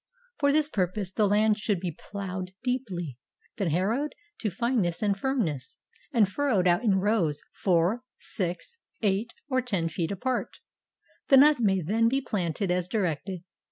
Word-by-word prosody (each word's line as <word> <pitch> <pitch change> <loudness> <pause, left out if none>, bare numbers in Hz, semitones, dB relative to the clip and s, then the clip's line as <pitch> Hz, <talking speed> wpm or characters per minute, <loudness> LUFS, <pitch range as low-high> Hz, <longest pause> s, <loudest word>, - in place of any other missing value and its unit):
For 285 -2 +4
this 300 0 +3
purpose 190 - -1
the 210 +1 +2
land 210 +1 +3
should 210 -3 0
be 175 -1 -3
plowed 185 +1 -6
deeply, 190 - -3 0.4
then 195 -6 0
harrowed 220 - 0 0.2
to 215 - -1
fineness 220 -5 0
and 205 -1 +2
firmness, 195 - -2 0.3
and 225 -6 +4
furrowed 205 -4 +1
out 175 +3 +3
in 205 -5 +3
rows 190 -7 +1
four, 185 +5 +2 0.2
six, 185 - -4 0.2
eight, 210 +3 0
or 260 -3 +1
ten 195 -9 -1
feet 165 +1 -2
apart. 250 +6 -2 0.7
The 270 - +7
nuts 290 -1 +6
may 195 -4 +3
then 225 +7 +2
be 265 +4 +2
planted 195 - -2
as 180 -1 0
directed. 185 -3 -2
200 Hz, 155 wpm, -27 LUFS, 180-235 Hz, 0.7 s, The